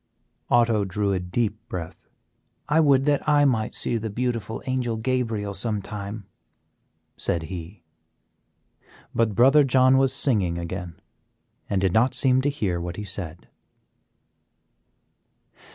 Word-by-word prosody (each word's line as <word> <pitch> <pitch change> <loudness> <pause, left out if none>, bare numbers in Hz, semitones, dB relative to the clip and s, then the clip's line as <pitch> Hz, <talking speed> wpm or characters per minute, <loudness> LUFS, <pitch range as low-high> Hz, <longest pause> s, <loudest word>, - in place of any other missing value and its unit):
'" - - -48
Otto 115 -3 +3
drew 100 +1 -1
a 95 - 0
deep 105 +4 -2
breath. 85 -3 -7 0.6
"I 150 +2 +3
would 140 -4 +4
that 145 -1 +2
I 145 -1 +4
might 115 -5 0
see 120 - +1
the 110 0 -4
beautiful 115 -1 -3
Angel 125 -3 -1
Gabriel 115 -4 -2
sometime," 105 -1 -4 0.9
said 85 -1 -2
he; 85 +1 -8 1.3
but 115 -3 +1
Brother 135 +6 +6
John 130 0 +4
was 135 -1 +3
singing 105 -11 +1
again 85 0 -6 0.7
and 100 - +1
did 95 -2 +1
not 120 +4 +3
seem 130 -1 +3
to 145 - +1
hear 95 -11 -2
what 85 0 -5
he 105 - -6
said. 90 -4 -4
110 Hz, 130 wpm, -24 LUFS, 95-130 Hz, 1.3 s, Brother